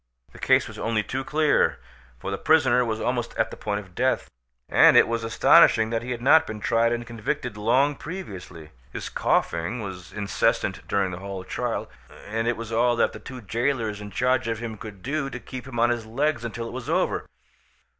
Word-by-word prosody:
The - - -14
case - - +3
was - - -10
only 110 -2 0
too 130 +4 -3
clear, 150 +2 +2 0.4
for 85 +10 -5
the 100 - -2
prisoner 130 -6 +4
was 110 -2 -2
almost 120 0 -2
at 115 - +1
the - - -7
point 105 -1 -3
of 95 -3 -17
death, 130 +6 0 0.4
and - - +6
it - - +7
was 115 0 -2
astonishing 115 0 +5
that 115 -1 0
he 120 - -7
had 120 -1 -4
not 160 +4 +6
been 110 -1 -6
tried 115 +2 +2
and 120 0 -2
convicted 115 0 -4
long 125 +7 +2
previously. 95 - -8 0.2
His - - -5
coughing 85 +8 0
was 95 -4 -7
incessant 100 -1 -1
during 100 -2 0
the 90 - -6
whole 95 -1 -6
trial, - - -3 0.4
and 115 +3 -2
it 120 - 0
was 115 0 -7
all 120 +1 +3
that 115 - +1
the - - -8
two 125 +3 -9
jailors 115 -1 -1
in 105 - -7
charge 125 +4 +1
of 115 -1 -1
him 115 -1 -5
could 100 -3 -10
do 140 +1 -2
to 125 0 -6
keep 130 +1 -8
him 120 -3 -5
on 120 +1 +4
his 115 -2 -3
legs 140 +3 0
until 115 0 -4
it - - -8
was 125 -2 -6
over. - - 0
115 Hz, 205 wpm, -25 LUFS, 105-125 Hz, 0.4 s, it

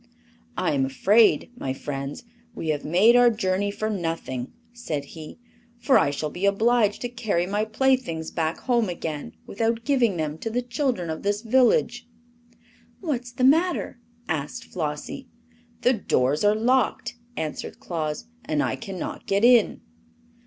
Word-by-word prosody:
"I - - +1
am 135 -2 +1
afraid, 205 - +3
my 135 - -3
friends, 140 +1 -5 0.3
we 160 - -4
have 150 -2 -1
made 195 +10 +5
our 245 0 +7
journey 205 -3 0
for 215 +2 -3
nothing," 165 - -3 0.2
said 155 -12 -4
he, 155 -2 -9 0.4
"for 260 +3 +2
I 145 - +2
shall 145 +1 -3
be 185 +5 -1
obliged 215 +1 +2
to 245 - -1
carry 220 -7 -1
my 205 +3 -1
playthings 220 -8 0
back 160 -1 -1
home 235 -5 +1
again 155 - -5
without 230 +2 -1
giving 245 -9 +2
them 155 -1 -3
to 225 - -3
the 245 +2 -1
children 240 - -1
of 160 - -5
this 205 +2 -1
village." 245 0 +2 0.9
"What's 250 -8 -3
the 250 +1 -3
matter?" 320 -1 +2 0.3
asked 145 -2 -3
Flossie. 155 - -5 0.5
"The 250 - +4
doors 145 - +1
are 205 +1 +4
locked," 245 +2 +1 0.2
answered 155 -1 -5
Claus, 155 +2 -4 0.2
"and 150 -2 0
I - - -1
can 195 -4 -7
not - - -6
get 200 +3 +2
in." 240 -3 +5
205 Hz, 150 wpm, -25 LUFS, 160-240 Hz, 0.9 s, our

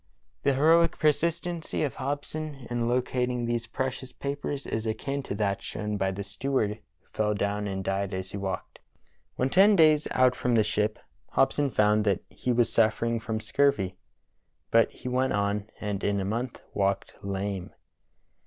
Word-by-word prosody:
The 140 -1 +2
heroic 165 +4 +4
persistency 165 +2 0
of 140 - -1
Hobson 145 0 -4
in 120 -1 0
locating 125 0 0
these 115 -1 -1
precious 130 +1 -3
papers 140 0 -4
is 110 0 -2
akin 135 +6 -2
to 100 - -5
that 100 -1 0
shown 105 0 -4
by 95 -1 +1
the 95 +1 -4
steward 105 0 -1 0.2
who - - -36
fell 105 -1 +1
down 100 +1 -1
and 95 -1 -3
died 95 +1 -1
as 95 0 -4
he - - -4
walked. 95 -1 -4 0.6
When 130 +1 0
ten 200 +3 +6
days 155 -3 +5
out 130 -1 +4
from 125 -1 +1
the 110 - +5
ship 105 0 0 0.4
Hobson 145 -1 +3
found 105 -2 +3
that 100 -3 +2
he 125 - -2
was 120 -1 +2
suffering 115 +1 +2
from 110 -1 -3
scurvy, 110 -7 +1 0.8
but 115 0 +5
he 125 - -10
went 130 +1 +1
on 100 +1 0
and 105 -2 -3
in 100 -1 +1
a 95 - -2
month 120 +5 -3
walked 100 0 0
lame. 100 -1 -3
115 Hz, 165 wpm, -28 LUFS, 100-135 Hz, 0.8 s, ten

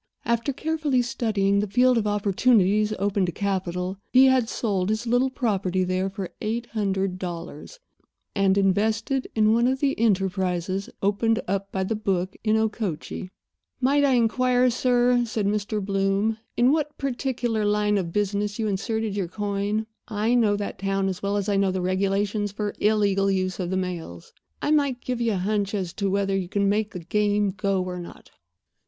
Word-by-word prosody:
After 235 +4 0
carefully 300 -3 0
studying 200 -4 +1
the 210 - 0
field 250 +4 +4
of 220 -2 +1
opportunities 210 0 +2
open 200 0 0
to - - -1
capital 185 -1 -2
he 260 +1 +7
had 260 -3 +3
sold 200 -4 -1
his 220 +2 -1
little 245 +3 +2
property 195 -7 0
there 185 +1 -1
for 195 -2 -6
eight 230 +3 -2
hundred 195 -3 -1
dollars 175 - -7 0.5
and 195 -1 +2
invested 220 +7 +1
it - - -30
in 215 0 +4
one 235 +2 +3
of 260 +1 0
the 275 -1 +1
enterprises 190 -3 0
opened 225 +3 +2
up 195 +1 -2
by 190 - -1
the 220 +4 -1
book 190 -3 -1
in 215 0 +2
Okochee. 210 -5 -3 0.5
"Might 280 +3 +3
I 275 -2 +4
inquire, 250 +2 +3
sir," 245 0 +3
said 220 -3 -2
Mr. 210 +1 -1
Bloom, 195 +2 0 0.2
"in 245 +2 +5
what 300 -1 -1
particular 245 -4 -1
line 210 0 +2
of 170 -3 -4
business 205 +1 -1
you 225 - -1
inserted 215 +1 -2
your 195 -4 -1
coin? 205 +2 -2 0.2
I 220 +1 0
know 220 -4 +3
that 205 0 -5
town 195 0 0
as 185 -1 -5
well 200 +1 0
as 200 0 -2
I 200 -1 +1
know 195 -1 +2
the 185 - -2
regulations 195 +3 0
for 205 0 -3
illegal 200 -2 +2
use 185 -1 -1
of 180 -2 -2
the 190 - -1
mails. 170 - -5 0.3
I - - +1
might 280 -5 +2
give 250 -1 -3
you 230 -2 +1
a - - -1
hunch 200 +2 -1
as 185 -4 -3
to 200 -2 -1
whether 195 0 0
you 185 -2 -2
can 200 +1 +1
make 210 +1 +1
the 180 - -7
game 205 +3 +1
go 195 0 -1
or 180 -1 -5
not." 175 - -11
205 Hz, 180 wpm, -25 LUFS, 195-230 Hz, 0.5 s, he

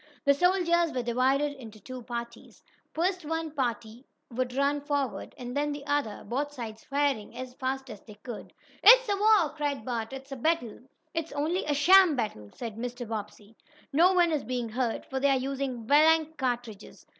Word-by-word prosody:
The 280 - +6
soldiers 345 0 +2
were 250 -1 -2
divided 260 +5 +1
into 225 -6 -12
two 255 +5 -8
parties. 235 0 -8 0.3
First 360 +2 -1
one 325 +1 -3
party 240 -4 -3 0.3
would 250 +1 -2
run 280 +1 +1
forward, 285 -2 -3
and 245 0 -7
then 295 +1 0
the 290 -1 -6
other, 285 -7 -1
both 285 +4 -2
sides 225 -5 -7
firing 275 -6 -1
as 255 0 -6
fast 265 +1 -3
as 210 -5 -9
they 210 - -13
could. 215 +2 -9 0.3
"It's - - +8
a 405 - +1
war!" 400 -7 +4
cried 285 -6 -2
Bert. 230 -2 -3
"It's 270 +1 -9
a - - -3
battle!" 250 -4 -1 0.3
"It's 330 -1 -3
only 315 +6 -1
a 295 - 0
sham 355 +2 +6
battle!" 210 - -4
said 230 -3 -7
Mr. 245 0 -5
Bobbsey. 210 0 -7 0.4
"No 350 +6 +5
one 350 -2 +4
is 305 -3 0
being 245 -2 -3
hurt, 240 0 -2
for 265 - -3
they 280 +1 +3
are 270 - +3
using 260 -3 -3
blank 315 +3 +4
cartridges. 245 -6 -4
270 Hz, 180 wpm, -28 LUFS, 240-300 Hz, 0.4 s, It's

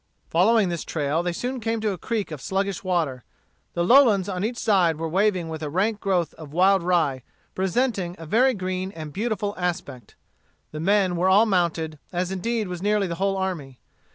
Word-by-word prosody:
Following 200 +3 +4
this 170 -2 -3
trail, 150 +1 -1
they 175 0 -1
soon 250 +8 -3
came 225 0 -1
to 215 -1 0
a 190 - -4
creek 215 -3 -3
of 150 -4 -6
sluggish 195 +3 -2
water. 160 -9 -1 0.5
The 170 - +1
lowlands 215 -3 +5
on 185 -1 -3
each 235 +3 -2
side 190 -8 +3
were 165 +1 -3
waving 185 0 +1
with 160 -1 -6
a 150 - -3
rank 200 +7 0
growth 185 -5 0
of 155 -3 -10
wild 190 +2 +4
rye, 165 -7 +1 0.3
presenting 190 -2 -1
a 165 - -9
very 250 +9 +3
green 185 0 -3
and 155 -2 -8
beautiful 210 0 -2
aspect. 145 - -4 0.6
The 155 - -6
men 190 0 +2
were 185 +2 +2
all 205 +4 +6
mounted, 170 -6 0
as 180 +1 -2
indeed 220 +3 -2
was 180 -1 -6
nearly 205 0 +2
the 170 - -3
whole 195 0 +1
army. 165 -9 -4
185 Hz, 190 wpm, -24 LUFS, 165-205 Hz, 0.6 s, all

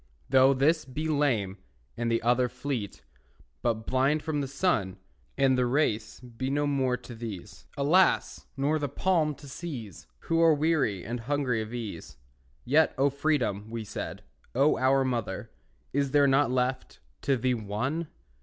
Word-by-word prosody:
Though 135 0 +6
this 155 +4 +3
be 150 +3 -4
lame, 120 -11 0 0.4
and 115 0 -1
the 115 - +1
other 125 +1 +3
Fleet, 125 - -5 0.6
but 110 -1 -1
blind 135 +4 +1
from 150 -2 -1
the 140 - -3
sun, 130 - 0 0.4
And 135 -1 +4
the 125 -1 +2
race 120 -5 0
be 125 +1 -5
no 145 +1 +1
more 135 -3 +1
to 120 0 -11
these, 105 -4 -8
Alas! 170 +7 +2
nor 145 +3 +1
the 145 -1 -2
palm 160 -2 +1
to 140 - -13
seize, 130 - -7
Who 165 0 +1
are 165 -2 +6
weary 145 - +1
and 120 +3 -3
hungry 125 -2 0
of 110 0 -6
ease, 105 - -6 0.5
Yet, 150 +5 +3
O 140 +1 +3
Freedom, 130 -8 0
we 115 -1 -4
said, 105 - -6 0.3
O 140 +4 +4
our 135 +1 +3
mother, 110 -3 -3 0.4
Is 140 -1 +1
there 145 +1 +4
not 135 -1 +3
left 130 +1 -1 0.2
to 135 -2 +1
thee 125 +2 +1
one? 125 +9 -2
130 Hz, 160 wpm, -28 LUFS, 115-145 Hz, 0.6 s, Though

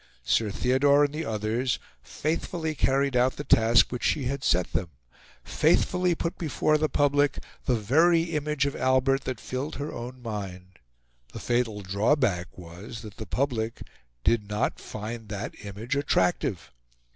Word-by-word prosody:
Sir 110 - +2
Theodore 140 +6 +3
and 145 0 0
the 155 +1 -3
others 110 +3 -1 0.2
faithfully 160 +1 -2
carried 135 -1 +1
out 125 +1 +3
the 145 - -5
task 115 -2 +4
which 125 - -4
she 145 - +1
had 135 +2 -3
set 90 0 +1
them 90 - -1 0.5
faithfully 180 -1 +2
put 170 +2 -3
before 155 -1 +1
the 155 0 +1
public 145 0 +2 0.3
the 125 - +2
very 160 +10 +4
image 150 -3 -1
of 140 - -2
Albert 130 +1 +2
that 130 -4 -3
filled 130 +7 -4
her 145 +1 -5
own 125 +2 -7
mind. 95 -6 -7 0.5
The - - -6
fatal 120 -4 0
drawback 100 - 0
was 90 +6 -9
that 105 -1 -10
the 110 - -7
public 115 -1 -2 0.4
did 105 +1 +1
not 105 +3 -1
find 110 +1 -7
that 105 +1 -4
image 105 +7 -4
attractive. 140 - 0
125 Hz, 150 wpm, -27 LUFS, 110-145 Hz, 0.5 s, task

